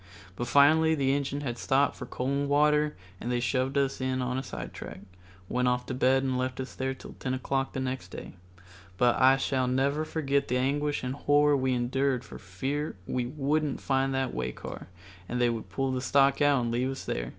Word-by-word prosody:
But 120 - -3
finally 155 +5 +5
the 135 -2 +1
engine 140 0 -2
had 120 -4 -3
to - - -8
stop 135 +1 +2
for - - -8
coal 125 - -4
and 140 +1 0
water, 150 +1 +3 0.2
and 120 - -3
they 120 - +1
shoved 130 +3 0
us 135 -1 0
in 130 0 -1
on 125 0 -1
a - - -2
sidetrack, 135 - -8 0.5
went 125 +4 0
off 125 0 +1
to 130 - -4
bed 130 +1 +3
and 130 -1 0
left 130 0 -2
us 130 0 -5
there 130 0 -2
till - - -11
10 130 0 -2
o'clock 135 +1 -2
the - - -3
next 130 0 -3
day. - - -9 0.6
But 120 +2 +4
I 130 +1 +6 0.3
never 140 +4 +1
shall 155 - -10
forget 140 -3 0
the 125 - +1
anguish 145 +3 0
and 125 0 -2
horror 145 +1 +3
we 130 -1 +1
endured 130 +1 0
for - - -10
fear 135 +12 -3
we 125 +2 -2
wouldn't 145 +2 -1
find 135 0 +1
that 135 -1 -1
way 60 0 -2
car - - -8 0.4
and 125 - -2
they 120 -1 +3
would 110 -5 -5
pull 135 +7 -1
the 130 -1 -2
stock 140 +2 +3
out 145 -3 +4
and 115 - -1
leave 125 +2 0
us 135 - -6
there. - - -3
135 Hz, 215 wpm, -28 LUFS, 125-140 Hz, 0.6 s, I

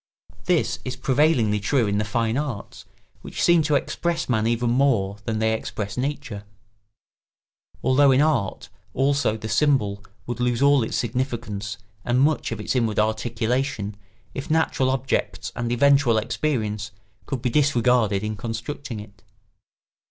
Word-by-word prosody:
This 180 -2 +1
is 130 0 -4
prevailingly 130 -6 +2
true 120 +4 +1
in 100 0 0
the - - +1
fine 115 +2 -1
arts 135 -7 -4 0.4
which - - -8
seem 170 -1 +5
to 150 -1 +1
express 170 +4 -1
man 110 -3 +1
even 120 0 +1
more 120 -7 +2
than 110 -1 -1
they 110 0 +1
express 110 -1 -4
nature; 125 -6 -3 1.4
although 140 +2 +5
in 130 0 +5
art 150 -10 0 0.3
also 135 -4 +1
the 110 - -6
symbol 105 -5 +1 0.2
would 120 +1 -5
lose 120 -1 +1
all 140 0 +5
its 110 - -2
significance 115 -4 -3 0.3
and 120 +1 +1
much 150 -1 +2
of 115 - -4
its 105 - -2
inward 115 -4 +1
articulation 110 0 -1 0.4
if 135 - -6
natural 155 -4 +2
objects 130 0 -1
and 120 0 -2
eventual 135 -1 +4
experience 110 -4 -1 0.4
could 130 -4 -4
be 125 - 0
disregarded 120 -7 +2
in 105 0 -2
constructing 115 +3 -5
it. 105 +1 -13
120 Hz, 145 wpm, -24 LUFS, 110-140 Hz, 1.4 s, seem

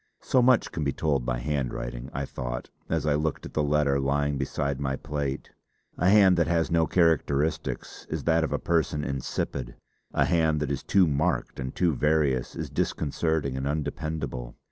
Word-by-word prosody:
So 130 - +3
much 125 -2 +4
can 80 - -3
be 70 - +1
told 70 -6 0
by - - 0
handwriting, 60 -2 -3
I 70 +1 -3
thought, - - -5 0.2
as - - 0
I 75 - +3
looked 75 0 -1
at - - -9
the 75 - +1
letter 75 -1 +2
lying 70 +1 +1
beside 70 0 -2
my 65 -1 -1
plate. 70 -1 -4 0.5
A 90 - +4
hand 100 -3 +6
that 85 -1 +2
has 85 -1 +1
no 80 -1 +3
characteristics 80 -3 0
is - - -3
that 80 0 +3
of 80 - -2
a - - +1
person 80 -3 0
insipid; 65 -2 -3 0.4
a - - +2
hand 80 -3 +2
that 75 -1 -1
is 70 - -2
too 95 -1 +4
marked 80 +2 0
and 65 0 -4
too 85 -3 +2
various 75 -4 +1
is - - -5
disconcerting 75 -2 -1
and 65 +1 -2
undependable. 75 -4 -3
75 Hz, 180 wpm, -27 LUFS, 70-80 Hz, 0.5 s, hand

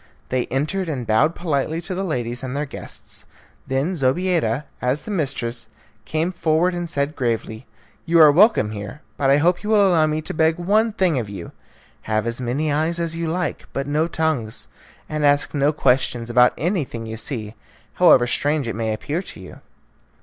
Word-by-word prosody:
They 130 -1 0
entered 160 +7 -1
and 130 -6 -3
bowed 115 +10 +2
politely 155 -1 -1
to 175 +2 -4
the 190 +2 -2
ladies 125 -8 -3
and 130 0 -5
their 150 - -1
guests. 140 - -8 0.4
Then 135 +7 0
Zobeida, 150 -2 +1 0.2
as 125 +4 0
the 215 - -6
mistress, 125 - -2 0.4
came 160 +3 -1
forward 170 0 +1
and 175 -1 -4
said 140 -1 -1
gravely, 115 -3 -3 0.4
"You 165 0 +4
are 155 -2 +9
welcome 180 - +4
here, 105 +7 -7
but 135 - +1
I 140 - +6
hope 175 +4 +2
you 210 - -5
will 205 -2 +5
allow 165 -4 +4
me 155 0 -1
to - - -5
beg 160 +1 +2
one 210 +6 +2
thing 185 - +1
of 110 -4 -5
you 95 -4 -8 0.6
have 110 0 +1
as 115 +2 -3
many 140 +6 -1
eyes 160 +3 0
as 165 -1 -2
you 165 0 -2
like, 175 0 -3
but 135 - -2
no 150 +3 +1
tongues; 155 - -2 0.4
and 155 -1 -3
ask 145 0 +3
no 145 0 +2
questions 125 -5 +1
about 125 +1 +5
anything 150 - -2
you 110 0 -5
see, 110 -2 -4 0.4
however 150 -9 +6
strange 145 +2 0
it 115 - -3
may 110 -1 -1
appear 150 +10 -3
to 135 - -9
you." 95 - -11
150 Hz, 185 wpm, -22 LUFS, 125-170 Hz, 0.6 s, are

